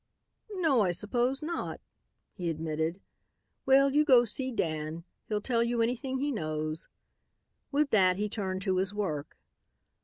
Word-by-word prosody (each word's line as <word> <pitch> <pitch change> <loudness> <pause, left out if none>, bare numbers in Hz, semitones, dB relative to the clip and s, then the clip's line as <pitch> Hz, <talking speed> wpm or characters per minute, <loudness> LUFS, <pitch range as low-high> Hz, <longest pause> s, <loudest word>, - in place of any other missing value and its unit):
"No, 315 - +3
I 190 - +2
suppose 245 - 0
not," 335 +2 -3 0.5
he 175 -3 -3
admitted. 160 +2 -2 0.7
"Well, 275 +1 +5
you 300 +1 +5
go 250 -4 +6
see 260 +4 -2
Dan. 160 -5 -2 0.2
He'll 210 -1 -1
tell 235 0 +1
you 235 0 -1
anything 250 +3 -1
he 285 +2 -1
knows." 155 - -3 0.8
With 290 0 +1
that 185 -3 +4
he 210 +1 0
turned 190 -3 -3
to 190 -2 +1
his 190 +2 0
work. 155 -9 -3
210 Hz, 145 wpm, -30 LUFS, 170-260 Hz, 0.8 s, go